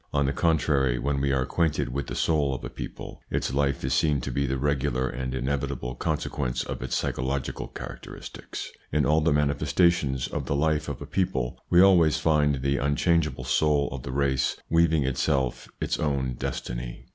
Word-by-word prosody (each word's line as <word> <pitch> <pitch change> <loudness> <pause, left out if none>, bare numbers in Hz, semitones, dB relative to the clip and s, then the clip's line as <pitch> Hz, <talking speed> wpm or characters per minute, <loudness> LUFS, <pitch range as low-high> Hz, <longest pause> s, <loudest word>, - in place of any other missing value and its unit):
On 70 -1 +2
the 70 - 0
contrary, 70 -5 +2
when 70 +2 -1
we 70 0 +1
are 65 -1 +2
acquainted 80 +3 0
with 70 +1 -3
the - - -5
soul 75 -4 +1
of - - -7
a - - -6
people, - - -8
its - - -1
life 70 0 0
is - - 0
seen 75 -3 +2
to 65 - -4
be 70 +3 0
the 65 +1 -1
regular 65 -2 0
and 65 +1 -4
inevit 65 +1 -1
able 60 +1 -5
consequence 60 0 -2
of - - -5
its 65 - -2
psychological 65 +1 -2
characteristics. - - -8 0.2
In 75 0 +2
all 80 +2 +3
the 75 - +2
manifestations 75 -1 +2
of - - -4
the 70 - 0
life 75 +1 +1
of 70 - -5
a - - -7
people, 90 -11 -1
we 90 - +6
always 85 -5 +5
find 75 -4 +2
the 70 +1 +1
unchangeable 75 0 +1
soul 70 +3 +2
of 65 -1 -5
the 60 - -6
race 65 -1 +1
weaving 80 -2 +4
itself 65 -1 0
its - - -1
own 70 -4 0
destiny. - - -5
70 Hz, 185 wpm, -26 LUFS, 65-75 Hz, 0.2 s, we